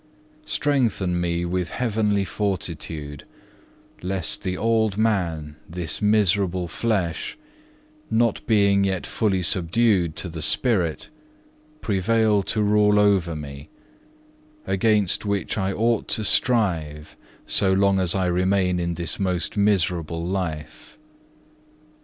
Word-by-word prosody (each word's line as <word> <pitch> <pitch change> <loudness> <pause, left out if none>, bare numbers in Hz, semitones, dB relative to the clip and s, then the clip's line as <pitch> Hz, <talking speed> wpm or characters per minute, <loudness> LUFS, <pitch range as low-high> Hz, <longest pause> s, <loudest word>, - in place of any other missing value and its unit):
Strengthen 110 -11 0
me 85 0 -1
with 90 -1 -2
heavenly 105 -3 0
fortitude, 80 -8 -4 0.8
lest 90 -2 -1
the 90 -1 -3
old 110 -3 +1
man, 85 -9 -1
this 85 0 -3
miserable 100 -4 +2
flesh, 90 -3 -2 0.7
not 115 -1 +1
being 100 -3 +3
yet 95 -2 -1
fully 95 -5 -1
subdued 90 -1 +1
to 90 - -3
the 80 -2 -7
spirit, 90 - 0 0.7
prevail 105 +1 +1
to 105 +2 -1
rule 105 0 +3
over 95 -5 +2
me; 70 -1 -9 1.0
against 100 0 +1
which 100 -2 -2
I 95 -2 -1
ought 115 +3 0
to 110 - -3
strive 85 -11 +2 0.3
so 95 - +2
long 100 0 +3
as 90 -1 +1
I 95 -1 +1
remain 90 0 +1
in 85 0 -2
this 85 0 -3
most 90 -1 -2
miserable 85 -5 0
life. 80 -5 -5
95 Hz, 110 wpm, -23 LUFS, 85-105 Hz, 1.0 s, being